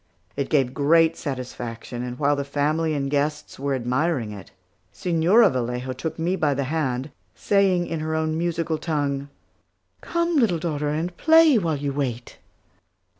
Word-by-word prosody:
It 140 -1 -2
gave 135 -4 +2
great 160 +3 +4
satisfaction; 120 -3 -6
and 125 0 -5
while 145 +1 +2
the 140 - -2
family 150 +3 0
and 140 -1 -1
guests 150 +1 -2
were 140 0 -1
admiring 130 -1 -1
it, 100 -3 -10 0.4
Señora 175 - +3
Vallejo 125 +1 -2
took 160 +5 -5
me 170 +3 0
by 150 -6 +1
the 140 - -1
hand, 135 -2 -2 0.2
saying 195 -3 +2
in 165 - -4
her 160 +1 -2
own 160 0 0
musical 165 -1 -1
tongue, 145 -3 -2 0.7
"Come, 340 -1 0
little 220 -10 +3
daughter, 150 -3 -2
and 165 +4 -2
play 320 -5 +6
while 165 -5 -1
you 140 0 -3
wait." 125 -4 -4
150 Hz, 155 wpm, -24 LUFS, 135-165 Hz, 0.7 s, play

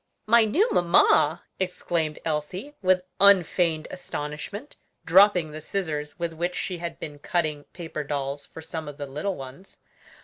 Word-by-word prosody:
"My 230 +1 +5
new 345 - +2
mamma!" 175 0 +4 0.2
exclaimed 170 -4 -2
Elsie, 165 - -3
with 185 -1 +3 0.2
unfeigned 180 -4 +4
astonishment, 180 - -6 0.3
dropping 180 -2 +5
the 155 +1 -7
scissors 155 -4 -3
with 170 -2 -3
which 175 +2 -2
she 180 -3 -3
had 170 -1 -5
been 145 -1 -7
cutting 155 -2 -1
paper 160 -3 -6
dolls 140 0 -4
for 160 - -11
some 160 -1 -6
of 145 -1 -8
the 145 - -4
little 150 +8 -3
ones. 135 +8 -11
165 Hz, 145 wpm, -26 LUFS, 150-185 Hz, 0.3 s, My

